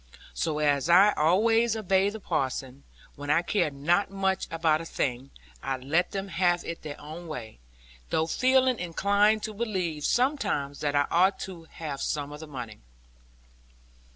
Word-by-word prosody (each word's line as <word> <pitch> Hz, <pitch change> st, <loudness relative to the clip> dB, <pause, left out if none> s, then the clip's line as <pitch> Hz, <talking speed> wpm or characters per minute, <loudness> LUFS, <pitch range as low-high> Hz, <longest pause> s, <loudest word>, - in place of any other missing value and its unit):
So 155 Hz, -2 st, -1 dB
as 145 Hz, 0 st, +1 dB
I 195 Hz, +4 st, +7 dB
always 225 Hz, +8 st, +3 dB
obey 195 Hz, -2 st, +2 dB
the 220 Hz, +2 st, -7 dB
parson, 135 Hz, -5 st, -3 dB, 0.3 s
when 145 Hz, 0 st, -7 dB
I 165 Hz, +4 st, +3 dB
care 190 Hz, -2 st, +1 dB
not 155 Hz, +8 st, +1 dB
much 195 Hz, -1 st, -1 dB
about 160 Hz, -1 st, +1 dB
a -, -, -7 dB
thing, 130 Hz, -4 st, -3 dB, 0.3 s
I 135 Hz, -1 st, -2 dB
let 150 Hz, +8 st, 0 dB
them 195 Hz, 0 st, -4 dB
have 175 Hz, -1 st, +1 dB
it 170 Hz, -, -6 dB
their 150 Hz, -1 st, -7 dB
own 160 Hz, +4 st, -9 dB
way; 120 Hz, -, -7 dB, 0.5 s
though 160 Hz, -, +1 dB
feeling 255 Hz, +5 st, +2 dB
inclined 200 Hz, +5 st, +2 dB
to 215 Hz, -, -4 dB
believe, 185 Hz, -9 st, -2 dB
sometimes, 240 Hz, -, 0 dB
that 145 Hz, -1 st, -1 dB
I 145 Hz, 0 st, +3 dB
ought 185 Hz, +3 st, +4 dB
to 175 Hz, -4 st, -7 dB
have 155 Hz, -4 st, -6 dB
some 145 Hz, -1 st, -2 dB
of 150 Hz, -, -8 dB
the 160 Hz, -, -9 dB
money. 125 Hz, -7 st, -8 dB
165 Hz, 160 wpm, -27 LUFS, 145-200 Hz, 0.5 s, I